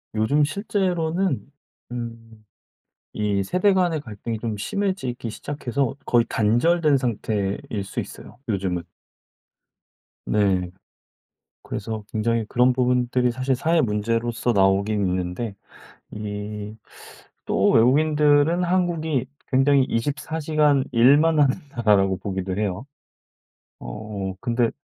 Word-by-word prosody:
요즘 140 +8 +2
실제로는 180 - -1 0.4
음 115 -2 -8 0.7
이 105 -2 0
세대 180 - +2
간의 175 -4 +1
갈등이 110 -1 -5
좀 110 -1 -3
심해지기 185 - -2
시작해서 135 0 -3
거의 120 -1 +3
단절된 140 +7 +3
상태일 105 -5 -1 0.2
수 95 - -4
있어요, - - -10
요즘은. 95 -4 -1 1.4
네. 95 -4 +1 0.9
그래서 110 0 -5
굉장히 115 +1 0
그런 125 +1 +3
부분들이 125 0 +1
사실 130 +2 -1
사회 160 +6 +2
문제로서 115 +2 0
나오긴 100 0 +2
있는데 90 +4 -2 0.6
이 105 0 -6 0.7
또 - - +2
외국인들은 150 +6 +4
한국이 170 -7 0 0.3
굉장히 135 +1 +4
24 140 +6 -2
시간 150 -3 +2
일만 145 +7 +5
하는 140 -2 +4 0.2
나라라고 100 -6 +2
보기도 95 -1 -4
해요. 105 +1 -2 1.0
어. 105 -3 -5
근데 120 -1 +1
120 Hz, 235 characters per minute, -23 LUFS, 105-145 Hz, 1.4 s, 일만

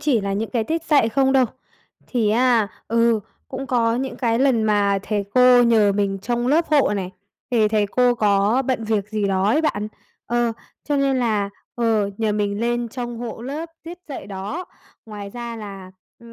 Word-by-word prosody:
chỉ 290 -6 +2
là 200 0 -2
những 215 +3 -2
cái 235 -3 0
tiết 325 +4 -2
dạy 285 -9 +3
không 265 +3 +2
đâu. 265 -1 +5 0.6
Thì 230 -5 0
á, 235 -2 +3 0.2
ừ, 230 -1 +3 0.3
cũng 270 +1 -5
có 230 -2 +1
những 265 +1 -3
cái 230 -2 0
lần 260 -4 +3
mà 205 -2 +2
thầy 205 -1 -2
cô 250 -1 +7
nhờ 220 -4 +4
mình 195 -1 -1
trông 240 +1 -1
lớp 320 +5 +3
hộ 295 -3 +4
này, 185 -2 -4 0.4
thì 225 -4 +3
thầy 210 -1 +1
cô 245 +4 +2
có 210 +2 +2
bận 255 -4 -1
việc 215 -2 -1
gì 210 -1 -1
đó 190 -1 +1
ấy 230 +9 +3
bạn. 210 -9 -1 0.4
Ờ, 240 -1 +1 0.3
cho 290 - 0
nên 275 -1 +2
là, 215 -5 0 0.2
ờ, 225 -4 +1
nhờ 220 -2 +1
mình 205 0 -1
lên 240 0 -1
trông 240 0 -5
hộ 230 -1 -6
lớp 295 +6 -5
tiết 340 +2 -9
dạy 280 - -7
đó, 200 - -5 0.4
ngoài 205 -2 -8
ra 235 +1 -6
là, 195 -4 -9 0.3
ừm, 235 0 -14
230 Hz, 195 wpm, -22 LUFS, 210-255 Hz, 0.6 s, cô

